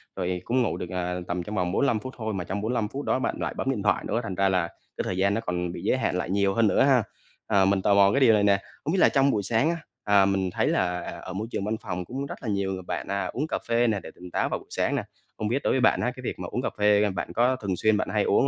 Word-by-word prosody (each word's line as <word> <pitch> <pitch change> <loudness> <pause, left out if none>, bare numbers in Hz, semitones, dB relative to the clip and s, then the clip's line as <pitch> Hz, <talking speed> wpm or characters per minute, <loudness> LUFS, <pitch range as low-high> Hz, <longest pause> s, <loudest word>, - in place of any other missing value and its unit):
rồi 90 -1 -2
cũng 125 +2 +2
ngủ 120 - 0
được, 90 - -5
à, 90 0 -2
tầm 90 0 -2
trong 105 +4 -6
vòng 90 -3 0
45 115 +2 +2
phút 130 +4 -8
thôi, 110 -2 -3
mà 95 -3 -2
trong 95 +3 -4
45 110 0 0
phút 140 +6 -6
đó - - +1
bạn 130 - -1
lại - - -2
bấm - - -1
điện 110 -7 -3
thoại 105 - +2
nữa, 115 - 0
thành 100 -5 -4
ra 100 +1 +2
là 90 -3 +1
cái - - -8
thời 90 - -3
gian 100 +1 +2
nó 110 - -1
còn 90 -4 -2
bị 85 - -7
giới 115 - +2
hạn 130 - 0
lại 90 - -3
nhiều 100 0 +2
hơn 115 +1 +3
nữa - - +3
ha. 130 -4 +4 0.4
À, 100 -3 +4
mình 95 0 +2
tò 100 - +3
mò 100 0 +6
cái 135 - +2
điều 125 -5 +6
này 105 -1 +3
nè, 100 -1 +4 0.2
không 155 - -1
biết 190 - +2
là - - +6
trong 140 -1 +3
buổi 105 -4 0
sáng 115 - +2
á, 170 - -1 0.3
à, 100 -2 +5
mình 95 -1 +1
thấy - - 0
là 90 -1 +1 0.2
ở 95 - -7
môi 105 +4 -3
trường 100 - -2
văn 110 +1 -1
phòng 90 -3 -4
cũng 135 +8 -4
rất 140 - -8
là 115 - -3
nhiều 100 -1 0
người 95 - -5
bạn, - - -4
à, 100 -1 -1
uống 140 +11 -3
cà - - -1
phê 120 +1 +3
nè 105 -3 +1
để 80 - -10
tỉnh 90 0 -11
táo - - 0
vào - - -2
buổi - - -18
sáng - - 0
nè, - - -1 0.3
không 110 - -2
biết 130 +6 -1
đối - - +2
với 130 - +2
bạn - - +4
á, - - 0
cái - - -9
việc - - -4
mà - - -4
uống - - -1
cà - - -1
phê 105 0 +4
bạn 95 - -4
có 125 +2 +3
thường 100 -7 -3
xuyên 110 +4 +2
bạn - - -1
hay 105 -1 +2
uống 135 - +3
100 Hz, 320 wpm, -26 LUFS, 95-115 Hz, 0.4 s, mò